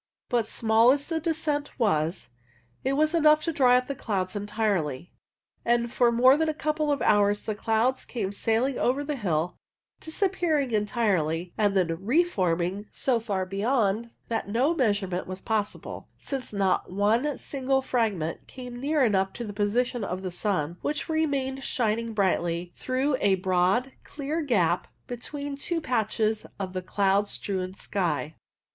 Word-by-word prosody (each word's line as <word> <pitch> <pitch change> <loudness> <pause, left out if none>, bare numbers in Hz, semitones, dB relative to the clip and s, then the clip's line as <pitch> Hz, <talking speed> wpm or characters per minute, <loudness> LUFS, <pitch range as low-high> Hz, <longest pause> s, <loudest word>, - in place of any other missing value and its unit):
But 235 -3 +1
small 225 +2 +4
as 285 +1 0
the 325 -1 -2
descent 305 -2 -2
was, 165 - 0 0.5
it 265 - +1
was 310 +3 +2
enough 305 -2 +5
to 330 - -1
dry 255 -5 +5
up 250 - 0
the 280 - -3
clouds 200 -7 -2
entirely, 200 - -1 0.5
and 235 0 +1
for 240 -1 +4
more 255 +3 +6
than 320 0 +1
a 310 - -2
couple 305 -1 0
of 285 - 0
hours 205 0 +3
the 215 - -3
clouds 225 +5 +1
came 195 -6 -3
sailing 230 +6 0
over 265 +4 +1
the 295 0 -3
hill, 175 - -1 0.4
disappearing 320 -6 0
entirely, 190 -7 0
and 205 -2 +2
then 170 -1 0
reforming 200 - +1
so 250 -3 +1
far 200 -5 -2
beyond 215 +2 0 0.2
that 225 -3 -2
no 255 +9 +2
measurement 205 - 0
was 185 0 -6
possible, 215 0 -3
since 270 -3 -5
not 195 -3 0
one 225 +9 +1
single 270 -1 -1
fragment 210 -11 -1
came 250 -2 -8
near 295 +1 +2
enough 195 -4 +2
to 240 - -5
the 210 -3 -6
position 225 +4 0
of 185 -1 -4
the 185 - -3
sun, 175 -4 -1
which 300 +3 -2
remained 275 -4 0
shining 230 -2 0
brightly 175 -3 0
through 260 +2 0
a 195 -1 +4
broad 185 +7 +1
clear 295 +3 -3
gap 185 - +1 0.2
between 280 +4 -5
two 330 +4 -1
patches 220 -5 0
of 190 -2 -4
cloud 200 0 +2
strewn 190 -2 -3
sky. 165 -9 -2
225 Hz, 150 wpm, -27 LUFS, 195-270 Hz, 0.5 s, more